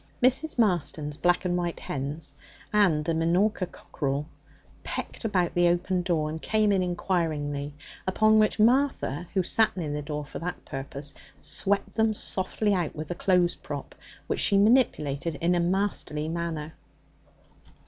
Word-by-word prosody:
Mrs. 265 +5 +3
Marston's 165 -8 +1
black 175 +4 +1
and 175 -1 +1
white 175 -1 -2
hens 145 +3 -4 0.4
and 180 -8 +3
the 165 - +1
minorca 180 +4 +1
cockerel 140 -4 -3 0.6
pecked - - -5
about 185 -6 +1
the 175 0 +4
open 175 +1 +1
door 170 -4 0
and 160 +1 -5
came 215 -1 +2
in 195 -2 +3
inquiringly, 155 -6 -1 0.3
upon 215 +3 +4
which 215 -1 +2
Martha, 225 - +2
who 190 - +3
sat 220 +3 +3
near 160 -5 -2
the 150 0 -2
door 150 0 -4
for - - -7
that 180 +2 -5
purpose, 140 +1 -5 0.3
swept 200 0 -1
them 220 -1 +2
softly 205 +2 0
out 175 -5 -1
with 155 0 -6
the - - -1
clothes 180 -1 +2
prop, - - -7 0.3
which - - -2
she 200 - +4
manipulated 170 - +2
in 170 +4 +1
a 175 - +2
masterly 175 -4 0
manner. 165 -2 -3
175 Hz, 150 wpm, -27 LUFS, 150-200 Hz, 0.6 s, the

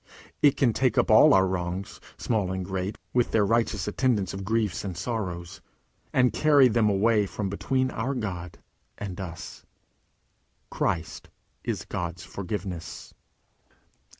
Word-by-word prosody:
It 145 -2 +5
can 120 -5 +3
take 130 -1 +1
up - - +3
all - - +8
our 95 0 +5
wrongs, 90 +1 -4 0.2
small 105 -6 -1
and 95 -1 -3
great, 95 +1 -3 0.2
with 125 -1 +2
their 105 -2 +3
righteous 115 -2 +1
attendance 105 -4 0
of 95 0 -5
griefs 110 -3 0
and 95 -4 -5
sorrows, 90 -5 -4 0.5
and 125 -3 +3
carry 145 0 +5
them 115 -2 +2
away 105 +1 +3
from 100 0 -3
between 130 +5 0
our 130 +5 -2
God 90 -7 -5 0.4
and 95 -2 -6
us. 85 -3 -8 1.1
Christ - - -2 0.3
is - - -3
God's 85 +1 -4
Forgiveness. 95 -3 -6
100 Hz, 135 wpm, -26 LUFS, 95-115 Hz, 1.1 s, all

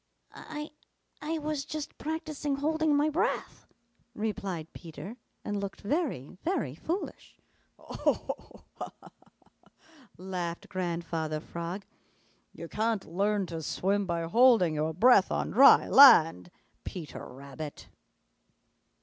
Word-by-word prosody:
"I 300 0 -7 0.5
I 320 +2 -2
was 300 -2 -3
just 305 0 -6
practising 305 -2 -3
holding 310 +1 +1
my 290 +1 +3
breath," 380 +11 -2 0.5
replied 195 -6 -4
Peter 175 +6 -9 0.3
and 205 -1 -2
looked 200 -1 -6
very, 205 - -2
very 330 - -1
foolish. 335 - -5 0.4
"Ho, - - -12
ho, - - +2 0.3
ho! - - -18
Ha, - - -6
ha, - - -16
ha!" - - -31 0.5
laughed 180 -2 -5
Grandfather 165 -4 -3
Frog. 170 +5 -6 0.7
"You 170 - -9
can't 220 +1 -1
learn 200 +1 +1
to 165 -2 -6
swim 195 +6 -1
by 170 -1 -1
holding 220 -2 +5
your 155 +1 -1
breath 215 0 +5
on - - -1
dry 270 +5 +7
land, 160 - +7 0.3
Peter 165 -5 -7
Rabbit." 140 +3 -9
200 Hz, 120 wpm, -29 LUFS, -, 0.7 s, dry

